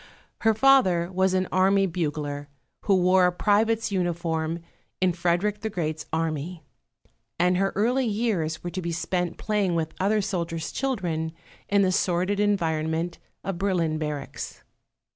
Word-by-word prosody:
Her 225 -1 +3
father 200 -10 +4
was 190 0 +2
an 185 0 +1
army 195 +1 +4
bugler, 150 -5 -3 0.4
who 200 - +4
wore 180 0 +4
private's 215 +4 +2
uniform 170 -3 -1 0.4
in 185 -1 +2
Frederick 180 +5 0
the 220 - -2
Great's 160 -5 -3
army; 160 +1 -2 0.7
and 180 +1 +3
her 195 +1 +1
early 245 +5 +2
years 205 -8 -1
were 175 - -4
to 185 - -4
be 170 -1 -3
spent 175 +1 -2
playing 205 -5 0
with 160 -1 -1
other 205 +3 +2
soldiers' 170 -5 -2
children 175 -12 -2 0.4
in 200 -1 +4
the 185 - +2
sordid 185 +2 +1
environment 165 -4 0 0.2
of 190 -3 -3
Berlin 170 -5 0
barracks. 150 -2 -5
180 Hz, 140 wpm, -26 LUFS, 165-200 Hz, 0.7 s, father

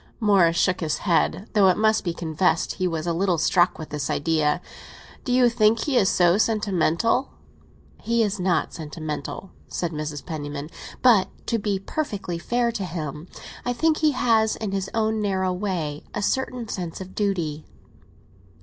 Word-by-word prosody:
Morris 190 -7 +4
shook 185 +1 +2
his 160 -3 -1
head, 185 +3 +1
though 205 -3 +5
it 185 - +3
must 220 0 +3
be 175 - -1
confessed 165 0 0
he 185 - -1
was 165 -2 -3
a 170 - 0
little 180 0 +1
struck 175 +2 +3
with 155 - -8
this 150 -1 -3
idea. 155 +1 +1 0.6
"Do 250 - -3
you 250 0 +5
think 225 -1 +3
he 285 - -1
is 195 -6 +4
so 175 +2 +3
sentimental?" 215 +2 +1 0.7
"He 235 0 +2
is 205 -2 -1
not 180 -1 0
sentimental," 155 +3 -6 0.2
said 175 -2 -3
Mrs. 150 -2 -5
Penniman; 145 -2 -5 0.3
"but, 230 -7 +6 0.2
to 230 - 0
be 205 -1 -1
perfectly 195 - -4
fair 240 +5 0
to 220 -4 -4
him, 160 -2 -5 0.4
I 245 - -1
think 315 +5 +2
he 310 -2 +2
has, 225 -3 +2
in 215 -3 -4
his 195 -1 -2
own 220 -1 +1
narrow 190 -2 0
way, 180 -6 -3
a 210 - -2
certain 250 -1 -1
sense 175 -5 -5
of 190 0 -9
duty." 170 -7 -2
190 Hz, 170 wpm, -24 LUFS, 165-220 Hz, 0.7 s, but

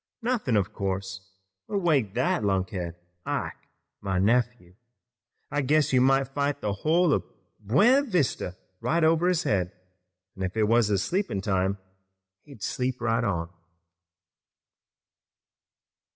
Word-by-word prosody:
Nothin', 225 - +1
of 95 -3 -1
course, 95 -1 -4 0.4
would 205 - -2
wake 135 - +2
that - - +1
lunkhead, 95 -3 -1 0.3
Ike, - - -4 0.3
my 95 -1 -1
nephew. 115 -2 +1 0.8
I 145 0 0
guess 145 +1 +2
you 130 - +5
might 135 0 +3
fight 145 +1 -1
the 105 -5 -2
whole 160 - +2
of 95 - +1 0.4
Buena 200 - +4
Vista 145 - -1 0.2
right 165 +1 +1
over 165 +2 +3
his 180 -2 +2
head, 90 - 0 0.6
an' 95 - -9
if 95 +3 -3
it 110 - +3
was 115 +1 +3
his 100 -2 +1
sleepin' 175 - -1
time 95 0 0 0.7
he'd 140 -8 -12
sleep 125 -1 -2
right 115 0 0
on." 85 -5 -2
115 Hz, 130 wpm, -26 LUFS, 95-145 Hz, 0.8 s, you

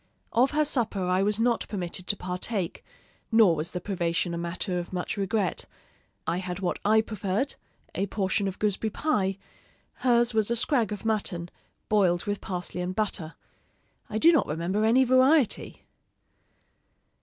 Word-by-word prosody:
Of 250 +4 +4
her 305 0 +2
supper 225 -9 0
I 180 +1 +2
was 210 +2 +1
not 235 0 +1
permitted 185 -2 -4
to 205 - +1
partake, 180 +1 -3 0.5
nor 220 -7 +6
was 155 +2 -3
the 180 - -4
privation 175 -2 -1
a - - -2
matter 180 +2 -3
of 175 - -7
much 180 0 -3
regret. 200 -1 -1 0.6
I 170 - 0
had 180 0 -4
what 185 -2 -2
I 220 +1 +5
preferred 215 +4 -2 0.4
a 195 - -1
portion 195 0 0
of 190 - -4
gooseberry 210 +1 0
pie; 200 -7 0 0.6
hers 240 -1 +2
was 220 -1 +2
a 235 - +1
scrag 235 -3 +2
of 210 +1 -5
mutton, 190 -6 -1 0.4
boiled 185 -5 +2
with 205 0 -2
parsley 180 -1 -4
and 180 +1 -3
butter. 190 -6 -2 0.7
I 215 - -2
do 330 +9 +6
not 315 - +2
remember 175 +7 -1
any 245 +4 +5
variety. 260 +1 +3
200 Hz, 155 wpm, -27 LUFS, 180-225 Hz, 0.7 s, nor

